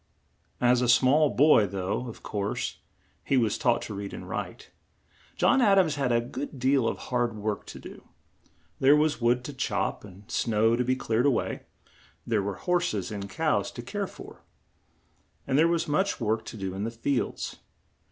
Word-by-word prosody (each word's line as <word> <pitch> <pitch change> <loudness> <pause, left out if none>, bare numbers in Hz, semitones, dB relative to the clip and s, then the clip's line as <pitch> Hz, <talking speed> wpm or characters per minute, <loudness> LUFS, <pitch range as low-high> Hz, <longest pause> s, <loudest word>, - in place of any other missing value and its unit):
As 125 0 +3
a 125 - +1
small 135 +5 +5
boy, 135 -8 +5
though, 95 +6 -3
of 115 - -10
course, 100 -1 -3 0.4
he 135 - +1
was 115 -4 +2
taught 120 -1 +1
to 105 - -6
read 100 0 -6
and - - -9
write, - - -6 0.6
John 270 - +3
Ad 200 -4 +5
ams 175 -6 +4
had 135 -4 -1
a 120 - +3
good 125 +4 -6
deal 130 -1 +2
of - - -1
hard 120 -2 -1
work 105 -1 -3
to - - -9
do. - - -12 0.7
There 135 +2 +6
was 150 -2 +1
wood 120 +1 +2
to 145 - -6
chop, 135 - -2
and 100 -1 -13
snow 115 0 +2
to 125 - 0
be 130 +1 +1
cleared 120 +1 +1
a - - +6
way; 130 - -2 0.6
there 110 -3 +1
were 100 -1 -5
hors 175 -9 +1
es 95 -1 -3
and 100 -1 -5
cows - - 0
to - - -7
care - - -3
for, - - -12 1.0
and - - -1
there 160 +4 +5
was 170 -1 0
much 190 +7 0
work 110 -1 -1
to - - -8
do 95 -2 -4
in 95 +2 -4
the 115 - -1
fields. 120 +3 -2
120 Hz, 190 wpm, -27 LUFS, 105-140 Hz, 1.0 s, There